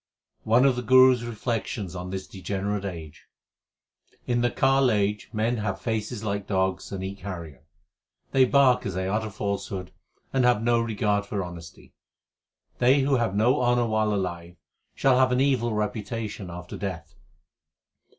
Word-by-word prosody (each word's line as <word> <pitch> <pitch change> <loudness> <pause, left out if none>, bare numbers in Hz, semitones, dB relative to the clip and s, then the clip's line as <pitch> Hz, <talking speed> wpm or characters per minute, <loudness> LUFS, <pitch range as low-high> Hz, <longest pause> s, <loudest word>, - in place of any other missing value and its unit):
One 120 +4 +4
of 135 -2 +4
the 125 - -2
Guru 130 +2 +7
s 125 - -4
reflections 115 -4 -4
on 90 +1 -5
this 95 0 -5
degenerate 100 +2 -3
age: 80 -5 -8 1.0
In 120 -1 0
the 120 - +2
Kal 135 +2 +3
age 105 -1 0
men 115 +2 0
have 100 -3 -3
faces 110 0 -3
like 100 -1 -3
dogs, 95 -1 -1
and 95 -1 -4
eat 100 +1 -6
carrion. 85 -8 -7 0.7
They 130 -1 +5
bark 130 -1 +4
as 95 - -4
they 95 0 -2
utter 110 +3 -1
falsehood, 100 -2 -4 0.4
and 135 -1 +2
have 120 -3 +3
no 120 0 +3
regard 105 -2 0
for 100 -2 -2
honesty. 85 -3 -11 0.9
They 130 +3 +4
who 135 0 +2
have 115 -5 -1
no 125 +6 +3
honour 120 -1 +2
while 110 -1 +1
alive, 90 -3 -3 0.4
shall 130 -2 +3
have 130 -1 +4
an 125 - +2
evil 130 -4 +2
reputation 105 -1 -4
after 90 0 -8
death. 85 -5 -6
105 Hz, 160 wpm, -26 LUFS, 95-120 Hz, 1.0 s, Guru